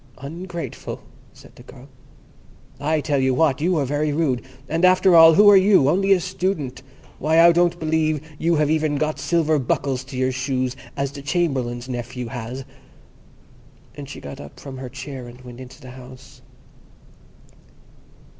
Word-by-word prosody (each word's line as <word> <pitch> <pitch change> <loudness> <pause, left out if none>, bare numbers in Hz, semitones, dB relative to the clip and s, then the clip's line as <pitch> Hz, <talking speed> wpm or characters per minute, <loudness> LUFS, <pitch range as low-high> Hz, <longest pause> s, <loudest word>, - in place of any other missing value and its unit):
"Ungrateful!" 170 +5 -7 0.3
said - - -18
the - - -15
girl. 130 +1 -14 0.9
"I 155 +2 0
tell 145 -1 0
you 130 -1 +1
what, 145 -2 +2
you 175 +2 +1
are 145 - 0
very 145 +3 -1
rude; 145 -5 0 0.3
and, 165 +4 -2
after 185 0 +5
all, 165 -1 +8
who 205 +3 +6
are 205 - +9
you? 190 -7 +5
Only 195 +5 +1
a 195 - +5
Student. 175 -8 -3 0.4
Why, 160 +2 +2
I 170 +1 +8
don't 175 0 +1
believe 155 -1 -1
you 170 +1 +1
have 150 -1 +1
even 155 -2 0
got 155 0 -2
silver 155 +1 +1
buckles 130 0 -1
to 135 -1 -8
your 130 0 +1
shoes 130 -1 -2 0.2
as 140 -1 -2
the 140 0 -9
Chamberlain's 135 -6 -2
nephew 125 -1 -5
has"; 125 +1 -6 1.3
and 140 -1 -9
she - - -8
got 70 - -9
up 70 - -13
from 135 -2 -9
her 130 -1 -7
chair 130 0 -8
and 120 +1 -13
went 125 -1 -12
into 130 +2 -12
the 130 -3 -12
house. 130 +1 -14
145 Hz, 165 wpm, -22 LUFS, 130-165 Hz, 1.3 s, are